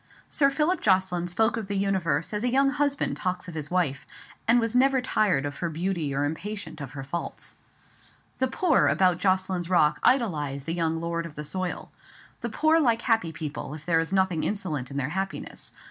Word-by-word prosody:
Sir 275 Hz, -2 st, +3 dB
Philip 310 Hz, +6 st, +1 dB
Jocelyn 185 Hz, -3 st, +2 dB
spoke 220 Hz, +6 st, +1 dB
of 220 Hz, -3 st, -4 dB
the 200 Hz, 0 st, -2 dB
universe 190 Hz, -5 st, 0 dB
as 210 Hz, +1 st, -1 dB
a 250 Hz, -, +2 dB
young 275 Hz, +2 st, +3 dB
husband 285 Hz, -1 st, 0 dB
talks 180 Hz, 0 st, -2 dB
of 175 Hz, -, -7 dB
his 155 Hz, -2 st, -4 dB
wife; 165 Hz, -7 st, 0 dB, 0.4 s
and 235 Hz, +2 st, +6 dB
was 230 Hz, 0 st, -1 dB
never 265 Hz, +1 st, +4 dB
tired 210 Hz, -, +1 dB
of 145 Hz, 0 st, -4 dB
her 170 Hz, -, -2 dB
beauty 165 Hz, -2 st, -2 dB
or 140 Hz, +1 st, 0 dB
impatient 165 Hz, +2 st, -5 dB
of 140 Hz, -2 st, -7 dB
her 135 Hz, -2 st, -6 dB
faults. 155 Hz, +6 st, -3 dB, 0.8 s
The 260 Hz, -, +2 dB
poor 320 Hz, +5 st, +3 dB
about 180 Hz, -2 st, +3 dB
Jocelyn's 185 Hz, -2 st, 0 dB
Rock 170 Hz, -4 st, +3 dB
idolized 150 Hz, -, +1 dB
the 165 Hz, -, -2 dB
young 165 Hz, -1 st, 0 dB
lord 170 Hz, 0 st, -2 dB
of 150 Hz, -, -14 dB
the 150 Hz, -, -5 dB
soil. 180 Hz, +4 st, -4 dB, 0.5 s
The 235 Hz, -, -3 dB
poor 315 Hz, +8 st, +3 dB
like 235 Hz, -7 st, +2 dB
happy 225 Hz, -9 st, +2 dB
people, 150 Hz, -2 st, -5 dB
if 155 Hz, -1 st, -11 dB
there 165 Hz, -2 st, +3 dB
is 165 Hz, +2 st, -2 dB
nothing 190 Hz, -4 st, +2 dB
insolent 160 Hz, -11 st, -2 dB
in 140 Hz, -, -6 dB
their 140 Hz, -1 st, -1 dB
happiness. 190 Hz, -2 st, -5 dB
185 Hz, 195 wpm, -26 LUFS, 160-225 Hz, 0.8 s, and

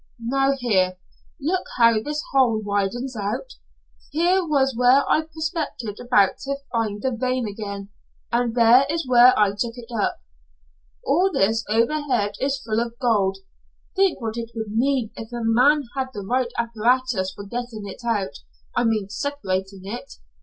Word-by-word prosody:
"Now 270 Hz, +4 st, +1 dB
here, 190 Hz, -7 st, +1 dB, 0.4 s
look 360 Hz, +6 st, -1 dB
how 230 Hz, -2 st, +5 dB
this 295 Hz, +4 st, -3 dB
hole 250 Hz, -5 st, +3 dB
widens 205 Hz, +5 st, -2 dB
out? 220 Hz, -, -3 dB, 0.6 s
Here 350 Hz, +5 st, +2 dB
was 275 Hz, -5 st, +1 dB
where 250 Hz, +3 st, +4 dB
I 310 Hz, -, +3 dB
prospected 315 Hz, -, -4 dB
about 225 Hz, -6 st, +3 dB
to 275 Hz, 0 st, -3 dB, 0.2 s
find 220 Hz, -3 st, -1 dB
the 260 Hz, -, +1 dB
vein 255 Hz, 0 st, -1 dB
again, 200 Hz, -1 st, -6 dB, 0.4 s
and 235 Hz, -1 st, 0 dB
there 245 Hz, +3 st, +6 dB
is 325 Hz, -2 st, -2 dB
where 250 Hz, 0 st, +7 dB
I 210 Hz, -1 st, +4 dB
took 230 Hz, +3 st, -3 dB
it 240 Hz, 0 st, -10 dB
up. 210 Hz, -, 0 dB, 0.9 s
All 370 Hz, +5 st, +3 dB
this 225 Hz, -, +1 dB
overhead 230 Hz, -2 st, +1 dB
is 275 Hz, +1 st, 0 dB
full 220 Hz, -1 st, 0 dB
of 235 Hz, 0 st, -3 dB
gold. 205 Hz, -6 st, +1 dB, 0.6 s
Think 390 Hz, -2 st, +2 dB
what 225 Hz, -2 st, -4 dB
it 230 Hz, -1 st, -4 dB
would 220 Hz, -2 st, -4 dB
mean 255 Hz, -2 st, +1 dB
if 225 Hz, 0 st, -8 dB
a 240 Hz, -1 st, -4 dB
man 255 Hz, +7 st, +4 dB
had 265 Hz, -1 st, -2 dB
the 200 Hz, -2 st, -5 dB
right 250 Hz, +2 st, 0 dB
apparatus 235 Hz, -3 st, +1 dB
for 200 Hz, -, -8 dB
getting 235 Hz, -1 st, -5 dB
it 195 Hz, -, -8 dB
out 205 Hz, -9 st, -1 dB, 0.4 s
I -, -, +2 dB
mean 215 Hz, -3 st, +1 dB
separating 195 Hz, -6 st, -3 dB
it! 210 Hz, +5 st, -7 dB
235 Hz, 160 wpm, -23 LUFS, 215-270 Hz, 0.9 s, where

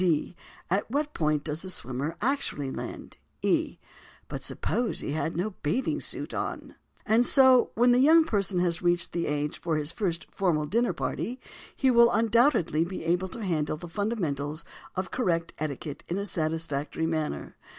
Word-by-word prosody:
D. 175 Hz, -1 st, +1 dB, 0.3 s
At 195 Hz, +5 st, 0 dB
what 295 Hz, +4 st, -1 dB
point 150 Hz, -2 st, +1 dB
does 155 Hz, +1 st, -2 dB
the 185 Hz, -, -4 dB
swimmer 140 Hz, -1 st, -4 dB
actually 250 Hz, -, 0 dB
land? -, -, -7 dB, 0.3 s
E. -, -, +1 dB, 0.5 s
But -, -, -5 dB
suppose 240 Hz, +2 st, -2 dB
that -, -, -5 dB
he -, -, -2 dB
has 160 Hz, +2 st, -1 dB
no 185 Hz, +6 st, -1 dB
bathing 160 Hz, -, 0 dB
suit -, -, -2 dB
on?_ -, -, -4 dB, 0.3 s
And 220 Hz, +3 st, +4 dB
so, 260 Hz, -1 st, +6 dB
when 245 Hz, +2 st, +5 dB
the 245 Hz, -, +5 dB
young 320 Hz, +5 st, +7 dB
person 200 Hz, -, 0 dB
has 170 Hz, -2 st, +1 dB
reached 175 Hz, -1 st, +1 dB
the 170 Hz, -1 st, -1 dB
age 145 Hz, 0 st, -2 dB
for 165 Hz, -2 st, 0 dB
his 150 Hz, +1 st, -1 dB
first 175 Hz, -5 st, -2 dB
formal 170 Hz, -6 st, +1 dB
dinner 230 Hz, +9 st, +1 dB
party, 250 Hz, +3 st, -3 dB, 0.4 s
he 265 Hz, -1 st, +3 dB
will 235 Hz, -1 st, +7 dB
undoubtedly 225 Hz, -, +3 dB
be 180 Hz, +1 st, -5 dB
able 175 Hz, +3 st, +1 dB
to 225 Hz, +4 st, -7 dB
handle 155 Hz, -4 st, 0 dB
the 175 Hz, -, -8 dB
fundamentals 165 Hz, -, -2 dB, 0.3 s
of 185 Hz, 0 st, -3 dB
correct 170 Hz, -9 st, 0 dB
etiquette 150 Hz, -1 st, -4 dB
in 175 Hz, -, -2 dB
a 200 Hz, -, -2 dB
satisfactory 160 Hz, -3 st, -2 dB
manner. 155 Hz, -2 st, -2 dB
175 Hz, 170 wpm, -28 LUFS, 155-230 Hz, 0.5 s, young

